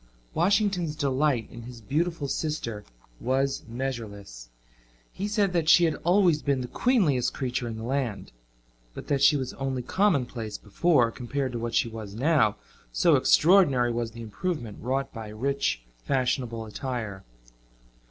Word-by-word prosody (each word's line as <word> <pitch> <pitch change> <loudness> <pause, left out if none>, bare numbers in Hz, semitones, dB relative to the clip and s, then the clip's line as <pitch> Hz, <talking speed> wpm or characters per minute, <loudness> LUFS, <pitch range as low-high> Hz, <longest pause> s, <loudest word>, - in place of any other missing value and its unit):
Washington's 185 -3 +1
delight 140 -4 +1
in 120 - -9
his 120 0 -10
beautiful 150 +6 -1
sister 130 -9 -3 0.4
was 135 +2 0
measureless. 110 - -6 0.6
He 200 - -3
said 205 -3 +1
that 165 -2 +1
she 175 - +7
had 160 - +1
always 175 -3 +4
been 140 -2 0
the 125 - -4
queenliest 165 - +1
creature 125 -2 -2
in 115 -1 -5
the 110 - -6
land, 125 -3 -2 0.6
but - - -9
that 140 -2 +1
she 145 - +6
was 130 -2 -4
only 135 -2 -3
commonplace 125 - 0
before, 120 - +2
compared 130 +2 -3
to 120 - -4
what 115 0 -3
she - - +3
was 110 -3 -8
now, 130 -4 +3 0.4
so - - +4
extraordinary 150 -9 +4
was 120 -1 -2
the 115 +1 -9
improvement 115 - -4
wrought 135 +3 -2
by 115 -3 -7
rich 110 - -1 0.2
fashionable 125 -4 -1
attire. 110 -4 -5
130 Hz, 145 wpm, -27 LUFS, 115-155 Hz, 0.6 s, she